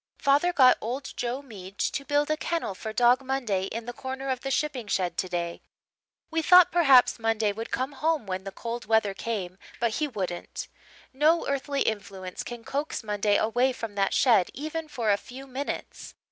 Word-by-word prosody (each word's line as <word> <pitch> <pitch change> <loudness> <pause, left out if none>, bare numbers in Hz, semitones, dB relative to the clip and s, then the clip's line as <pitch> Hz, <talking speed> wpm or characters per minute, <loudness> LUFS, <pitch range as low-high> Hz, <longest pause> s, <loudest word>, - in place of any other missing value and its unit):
"Father 290 +5 +3
got 260 -7 +6
old 255 +5 -4
Joe 250 +3 -3
Mead 200 -6 -11
to 280 - -1
build 290 +1 +1
a - - +3
kennel 330 - -2
for 220 +3 -6
Dog 245 +3 +4
Monday 245 -8 -1
in 225 +3 -5
the 245 - -5
corner 265 +2 -5
of 255 - -1
the 270 - -4
shipping 270 -4 -1
shed 180 -4 0
today. 175 -2 -3 0.7
We 325 0 +1
thought 360 +2 +7
perhaps 275 -9 +5
Monday 225 -2 +1
would 225 +3 -6
come 260 +3 -2
home 305 -1 0
when 190 -1 -4
the 195 - -6
cold 235 +3 -5
weather 220 -2 +2
came 195 -4 -4 0.2
but 230 -2 0
he 305 - 0
wouldn't. 185 -9 -5 0.5
No 310 +5 +3
earthly 280 0 -1
influence 195 -4 -4
can 240 -1 -8
coax 285 +2 -3
Monday 205 -1 +1
away 245 +4 +2
from 225 -4 -6
that 195 -1 0
shed 220 -8 +4
even 310 +3 -4
for 235 -7 0
a 200 - +3
few 260 +5 -10
minutes. 270 +2 -6
240 Hz, 185 wpm, -27 LUFS, 205-275 Hz, 0.7 s, thought